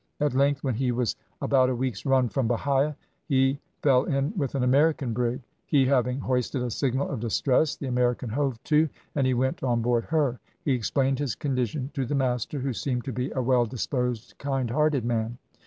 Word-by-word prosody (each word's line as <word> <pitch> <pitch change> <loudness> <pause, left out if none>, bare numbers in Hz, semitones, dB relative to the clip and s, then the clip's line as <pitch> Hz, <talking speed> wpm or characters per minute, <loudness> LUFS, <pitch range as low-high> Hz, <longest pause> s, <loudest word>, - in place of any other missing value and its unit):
At 150 -3 +1
length 140 +1 +2
when 130 -3 0
he 125 +2 0
was 120 -2 0 0.3
about 130 -2 +4
a 130 - 0
week's 125 -4 -3
run 130 -2 +4
from 120 +2 -1
Bahia, 140 +5 +1 0.3
he 135 -1 +2 0.2
feel 135 -2 +4
in 140 +5 0
with 140 -7 -2
an 135 - +1
American 140 -1 +3
brig. 120 +3 -1 0.2
He 140 -3 +4
having 125 -1 +2
hoisted 125 0 -1
a 125 - -2
signal 130 +3 0
of - - -4
distress, 125 +6 +1
the - - -7
American 125 -1 0
hove 135 +1 -1
to, 155 0 +3 0.2
and 135 -3 +1
he 130 - +2
went 130 +2 0
on 120 -3 +1
board 120 -1 +1
her. 145 -7 0 0.3
He 140 - +2
explained 130 +2 +1
his 140 -7 -1
condition 130 0 -2
to 135 -5 -2
the 145 - -1
master, 130 +1 -1
who 135 -1 -2
seemed 125 0 -2
to 135 - -3
be 125 +3 -2
a 130 - -1
well 125 -1 +3
disposed, 125 0 -2
kind 135 -4 -1
hearted 150 -3 +2
man. 115 0 -1
130 Hz, 200 wpm, -26 LUFS, 125-140 Hz, 0.3 s, about